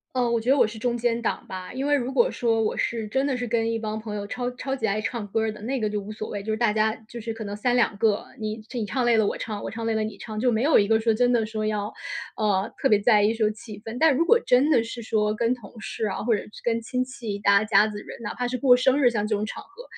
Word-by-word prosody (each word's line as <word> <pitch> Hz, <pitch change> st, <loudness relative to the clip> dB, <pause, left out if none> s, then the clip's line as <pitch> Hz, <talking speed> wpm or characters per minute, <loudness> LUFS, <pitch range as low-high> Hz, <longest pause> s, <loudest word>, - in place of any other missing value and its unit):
呃， 250 Hz, -1 st, +2 dB
我 235 Hz, -1 st, +1 dB
觉 235 Hz, +3 st, 0 dB
得 275 Hz, -, +5 dB
我 -, -, +5 dB
是 220 Hz, -, -8 dB
中 240 Hz, +2 st, -1 dB
间 235 Hz, 0 st, 0 dB
档 -, -, -2 dB
吧， 185 Hz, -1 st, -7 dB
因 265 Hz, +2 st, -3 dB
为 290 Hz, -, +3 dB
如 265 Hz, -2 st, 0 dB
果 240 Hz, -3 st, +4 dB
说 225 Hz, -2 st, +1 dB
我 215 Hz, -, -1 dB
是 225 Hz, -2 st, -1 dB
真 265 Hz, +6 st, 0 dB
的 265 Hz, -, 0 dB
是 245 Hz, -, -3 dB
跟 230 Hz, -1 st, 0 dB
一 230 Hz, -, -1 dB
帮 215 Hz, -1 st, -3 dB
朋 215 Hz, -1 st, -5 dB
友 205 Hz, -, -4 dB
超 245 Hz, +3 st, -3 dB
超 260 Hz, +2 st, -4 dB
级 255 Hz, -, -6 dB
爱 215 Hz, 0 st, +1 dB
唱 225 Hz, 0 st, -3 dB
歌 220 Hz, +3 st, 0 dB
儿 220 Hz, -, 0 dB
的， 210 Hz, -, -12 dB
那 260 Hz, +4 st, -2 dB
个 215 Hz, -3 st, 0 dB
就 210 Hz, 0 st, -2 dB
无 205 Hz, +2 st, -9 dB
所 215 Hz, 0 st, -6 dB
谓， 205 Hz, -1 st, -5 dB
就 220 Hz, -, -2 dB
是 215 Hz, -, 0 dB
大 235 Hz, -3 st, +3 dB
家 220 Hz, 0 st, +2 dB, 0.2 s
就 235 Hz, -, -8 dB
是 225 Hz, +1 st, -4 dB
可 220 Hz, 0 st, -7 dB
能 205 Hz, 0 st, -5 dB
3 245 Hz, +3 st, +1 dB
2 230 Hz, -4 st, +2 dB
个， 210 Hz, -1 st, +1 dB
你 215 Hz, 0 st, -3 dB
你 235 Hz, -, -1 dB
唱 250 Hz, +5 st, -1 dB
累 235 Hz, -1 st, +4 dB
了 220 Hz, -, +4 dB
我 -, -, -1 dB
唱， 210 Hz, -2 st, -5 dB
我 -, -, -4 dB
唱 230 Hz, 0 st, -5 dB
累 225 Hz, -, +1 dB
了 220 Hz, -, 0 dB
你 215 Hz, -1 st, -5 dB
唱， 215 Hz, -1 st, -6 dB
就 250 Hz, +1 st, +3 dB
没 225 Hz, +2 st, +1 dB
有 295 Hz, -6 st, +5 dB
一 200 Hz, -, 0 dB
个 220 Hz, 0 st, +4 dB
说 225 Hz, 0 st, +2 dB
真 245 Hz, +2 st, +3 dB
的 230 Hz, -3 st, +2 dB
说 215 Hz, 0 st, -3 dB
要， 210 Hz, -1 st, -2 dB, 0.4 s
呃， 205 Hz, -3 st, +1 dB
特 270 Hz, -, +4 dB
别 210 Hz, -4 st, +5 dB
在 210 Hz, 0 st, +4 dB
意 210 Hz, +2 st, +3 dB
说 220 Hz, -2 st, +2 dB
气 210 Hz, -1 st, -10 dB
氛。 230 Hz, +2 st, -5 dB
但 320 Hz, -2 st, +6 dB
如 335 Hz, -, +2 dB
果 470 Hz, +5 st, +5 dB
真 255 Hz, +4 st, +4 dB
的 245 Hz, -7 st, +4 dB
是 230 Hz, +1 st, -6 dB
说 215 Hz, -2 st, 0 dB
跟 230 Hz, +3 st, +1 dB
同 225 Hz, -1 st, -13 dB
事 220 Hz, 0 st, -3 dB
啊， 200 Hz, -, -3 dB
或 230 Hz, -, +3 dB
者 205 Hz, -, -1 dB
是 210 Hz, -, -13 dB
跟 230 Hz, -1 st, +1 dB
亲 250 Hz, +3 st, -2 dB
戚 235 Hz, -5 st, -6 dB
大 200 Hz, 0 st, +4 dB
家 210 Hz, -1 st, +5 dB
子 210 Hz, -1 st, -5 dB
人， -, -, -10 dB
哪 210 Hz, -, -5 dB
怕 245 Hz, 0 st, -2 dB
是 255 Hz, -, -2 dB
过 250 Hz, 0 st, +6 dB
生 260 Hz, +3 st, +3 dB
日， 245 Hz, -3 st, +5 dB
像 210 Hz, -3 st, -1 dB
这 210 Hz, -, +1 dB
种 210 Hz, -, -2 dB
场 -, -, -7 dB
合， 485 Hz, -, -14 dB
225 Hz, 335 characters per minute, -25 LUFS, 215-245 Hz, 0.4 s, 但